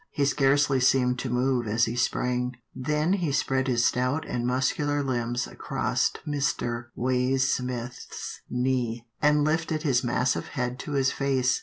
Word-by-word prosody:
He 145 Hz, -, 0 dB
scarcely 140 Hz, -1 st, +3 dB
seemed 125 Hz, -1 st, +3 dB
to 130 Hz, -, -3 dB
move 125 Hz, -1 st, +1 dB
as 115 Hz, +3 st, +2 dB
he 115 Hz, -, -3 dB
sprang, 125 Hz, +1 st, 0 dB, 0.2 s
then 150 Hz, +6 st, 0 dB
he 175 Hz, -7 st, 0 dB
spread 135 Hz, -1 st, +1 dB
his 120 Hz, -2 st, +2 dB
stout 125 Hz, +5 st, 0 dB
and 120 Hz, 0 st, -2 dB
muscular 145 Hz, +3 st, 0 dB
limbs 120 Hz, -2 st, -1 dB
across -, -, -1 dB, 0.2 s
Mr. 130 Hz, -5 st, -1 dB
Waysmith's 125 Hz, -1 st, -1 dB
knees, 125 Hz, -2 st, 0 dB, 0.2 s
and 150 Hz, 0 st, +4 dB
lifted 155 Hz, 0 st, 0 dB
his 135 Hz, -5 st, +2 dB
massive 125 Hz, +1 st, 0 dB
head 125 Hz, 0 st, -2 dB
to 150 Hz, -, -5 dB
his 135 Hz, -2 st, +2 dB
face. 135 Hz, -2 st, +1 dB
130 Hz, 145 wpm, -27 LUFS, 125-140 Hz, 0.2 s, and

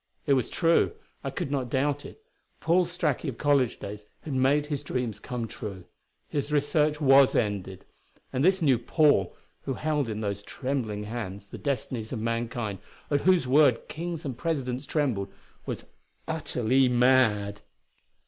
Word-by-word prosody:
It 140 Hz, -, +4 dB
was 130 Hz, -3 st, +1 dB
true 165 Hz, 0 st, +3 dB, 0.3 s
I -, -, -2 dB
could 140 Hz, -, -4 dB
not 130 Hz, -4 st, -1 dB
doubt 145 Hz, +2 st, 0 dB
it 440 Hz, -, -15 dB, 0.4 s
Paul 175 Hz, +2 st, +3 dB
Straki 165 Hz, -5 st, -1 dB
of 120 Hz, -, -7 dB
college 140 Hz, -5 st, +2 dB
days 105 Hz, +1 st, -8 dB
had 150 Hz, -, -5 dB
made 135 Hz, +3 st, +3 dB
his 145 Hz, -2 st, -3 dB
dreams 120 Hz, -5 st, -3 dB
come 120 Hz, +1 st, -4 dB
true; 100 Hz, -5 st, -7 dB, 0.4 s
his 145 Hz, 0 st, -3 dB
research 150 Hz, +1 st, +2 dB
was 135 Hz, -2 st, +6 dB
ended. 95 Hz, -3 st, -1 dB, 0.5 s
And 130 Hz, -, 0 dB
this 190 Hz, 0 st, +3 dB
new 130 Hz, -6 st, +4 dB
"Paul" 120 Hz, -, +3 dB, 0.3 s
who 135 Hz, -, -2 dB
held 150 Hz, -4 st, -1 dB
in 110 Hz, 0 st, -3 dB
those 100 Hz, -1 st, -2 dB
trembling 120 Hz, -4 st, -3 dB
hands 100 Hz, -3 st, -6 dB
the -, -, -8 dB
destinies 125 Hz, -5 st, -3 dB
of 130 Hz, -, -2 dB
mankind, 115 Hz, -2 st, -2 dB, 0.3 s
at 145 Hz, -1 st, +2 dB
whose 185 Hz, -7 st, +4 dB
word 130 Hz, -2 st, +4 dB
kings 170 Hz, 0 st, -5 dB
and 135 Hz, -3 st, -3 dB
presidents 135 Hz, -3 st, -2 dB
trembled, 125 Hz, -11 st, 0 dB, 0.4 s
was -, -, -4 dB, 0.4 s
utterly 125 Hz, +2 st, +1 dB
mad! 120 Hz, -5 st, +3 dB
130 Hz, 155 wpm, -27 LUFS, 110-145 Hz, 0.5 s, was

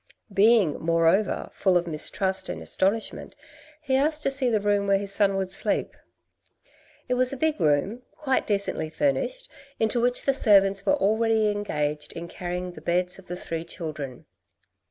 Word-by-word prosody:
Being 205 Hz, -5 st, +4 dB
moreover 165 Hz, +5 st, +1 dB
full 185 Hz, -2 st, +2 dB
of 175 Hz, -, -1 dB
mistrust 190 Hz, +4 st, -1 dB
and -, -, -4 dB
astonishment, 200 Hz, +4 st, -2 dB, 0.5 s
he 265 Hz, -, 0 dB
asked 300 Hz, +3 st, +1 dB
to 275 Hz, -, +2 dB
see 270 Hz, -2 st, +2 dB
the 220 Hz, -2 st, +2 dB
room 205 Hz, 0 st, 0 dB
where 195 Hz, 0 st, +4 dB
his 200 Hz, 0 st, -4 dB
son 200 Hz, -1 st, +2 dB
would 190 Hz, -1 st, -2 dB
sleep. 195 Hz, -, -1 dB, 1.1 s
It 250 Hz, -, 0 dB
was 250 Hz, 0 st, +4 dB
a 275 Hz, -, -4 dB
big 310 Hz, +2 st, 0 dB
room, 155 Hz, -, +1 dB
quite 265 Hz, -4 st, -1 dB
decently 200 Hz, -6 st, -1 dB
furnished, -, -, -1 dB, 0.3 s
into 225 Hz, +2 st, +1 dB
which 245 Hz, +1 st, +1 dB
the 275 Hz, -, +2 dB
servants 200 Hz, -6 st, +3 dB
were 290 Hz, -, +4 dB
already 220 Hz, -2 st, +2 dB
engaged 150 Hz, -8 st, -3 dB
in 170 Hz, +1 st, -7 dB
carrying 180 Hz, +1 st, -5 dB
the 155 Hz, -, -12 dB
beds 180 Hz, +3 st, -1 dB
of 190 Hz, -, -16 dB
the 180 Hz, -, -5 dB
three 165 Hz, -2 st, -5 dB
children. 150 Hz, -7 st, -7 dB
200 Hz, 165 wpm, -25 LUFS, 175-235 Hz, 1.1 s, Being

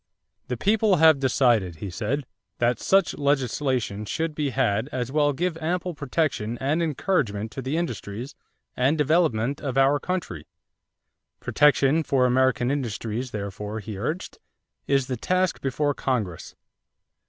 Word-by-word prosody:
"The 125 Hz, -, -3 dB
people 210 Hz, -, +3 dB
have 160 Hz, -3 st, +6 dB
decided," 120 Hz, -, +2 dB
he 95 Hz, +4 st, -6 dB
said, 120 Hz, +9 st, -2 dB, 0.3 s
"that 120 Hz, 0 st, +1 dB
such 195 Hz, 0 st, +2 dB
legislation 130 Hz, -6 st, 0 dB
should 160 Hz, +8 st, -2 dB
be 150 Hz, -1 st, -1 dB
had 110 Hz, +1 st, 0 dB
as 125 Hz, -1 st, -3 dB
will 145 Hz, 0 st, +3 dB
give 170 Hz, +4 st, -1 dB
ample 175 Hz, +2 st, -2 dB
protection 140 Hz, -6 st, -1 dB
and 145 Hz, +5 st, 0 dB
encouragement 135 Hz, -, -1 dB
to 135 Hz, -, -6 dB
the 135 Hz, +5 st, -2 dB
industries 120 Hz, -, -4 dB, 0.4 s
and 135 Hz, +5 st, +2 dB
development 145 Hz, -5 st, +1 dB
of 135 Hz, -2 st, -3 dB
our 135 Hz, +2 st, +4 dB
country." 170 Hz, -, -4 dB, 0.9 s
Protection 145 Hz, +1 st, +3 dB
for 135 Hz, -4 st, +2 dB
American 130 Hz, 0 st, +2 dB
industries, 120 Hz, -2 st, -3 dB
therefore, 105 Hz, 0 st, -5 dB
he 105 Hz, 0 st, -7 dB
urged, 155 Hz, -, -4 dB, 0.5 s
is 135 Hz, -2 st, +2 dB
the 125 Hz, -1 st, -3 dB
task 185 Hz, +7 st, 0 dB
before 145 Hz, +2 st, 0 dB
Congress. 110 Hz, -12 st, -3 dB
135 Hz, 135 wpm, -25 LUFS, 115-155 Hz, 0.9 s, have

